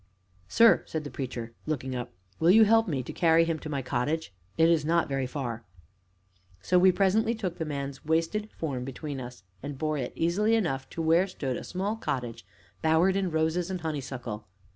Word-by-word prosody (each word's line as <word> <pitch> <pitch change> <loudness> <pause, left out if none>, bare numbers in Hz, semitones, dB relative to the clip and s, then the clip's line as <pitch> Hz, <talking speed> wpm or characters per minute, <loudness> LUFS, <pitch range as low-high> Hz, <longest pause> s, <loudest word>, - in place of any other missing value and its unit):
"Sir," 230 - +6
said 160 -1 -3
the 145 - -7
Preacher, 120 -3 -5
looking 135 -4 -2
up, 120 0 -5 0.3
"will 165 - +4
you 220 +4 +8
help 225 +1 +4
me 140 -7 -1
to - - -7
carry 165 -1 +4
him 165 -1 -1
to 155 - -7
my 140 -3 -2
cottage? 130 +1 -2 0.2
It 160 - +5
is 165 -3 +3
not 165 +2 +2
very 135 -2 -1
far." 120 -4 -4 1.0
So 180 - +3
we 185 +1 +6
presently 215 +5 +2
took 185 -6 -4
the 160 - -1
man's 140 -2 -5
wasted 165 +7 0
form 135 -6 -3
between 135 +1 -5
us 120 -6 -9 0.2
and 140 0 -6
bore 155 0 -1
it, 125 - -3
easily 205 +7 +2
enough, 135 -12 -1
to 165 - -4
where 165 +4 +4
stood 135 -8 -3
a - - -5
small 195 +4 -2
cottage 125 - -4 0.4
bowered 160 +4 +3
in 195 -2 0
roses 160 +2 0
and 185 -2 -4
honeysuckle. 130 -8 -5
160 Hz, 190 wpm, -28 LUFS, 135-180 Hz, 1.0 s, you